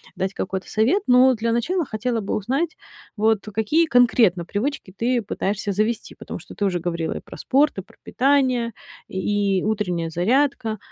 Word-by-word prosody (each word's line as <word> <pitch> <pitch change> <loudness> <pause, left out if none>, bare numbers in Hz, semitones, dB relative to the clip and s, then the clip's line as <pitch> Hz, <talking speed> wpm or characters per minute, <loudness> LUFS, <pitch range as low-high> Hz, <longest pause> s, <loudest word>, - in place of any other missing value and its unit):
дать 190 +1 -2
какой-то 190 0 -4
совет, 260 - +2
но 255 +1 +6
для 230 0 -1
начала 320 +10 0
хотела 235 0 -2
бы 200 - -2
узнать, 270 - -1 0.4
вот, 220 0 +2
какие 260 +11 +2
конкретно 235 - +4
привычки 205 - -3
ты 240 +1 +1
пытаешься 205 0 -2
завести, 215 +3 -1
потому - - -8
что - - -13
ты 205 - -1
уже 180 -2 0
говорила 170 -1 -2
и - - -5
про - - -12
спорт, 280 -2 +2
и - - -2
про - - -22
питание, 255 -3 +1 0.3
и 190 0 -4 0.2
и 195 -2 +1
утренняя 180 -6 -1
зарядка. 225 - +1
220 Hz, 170 wpm, -22 LUFS, 195-255 Hz, 0.4 s, но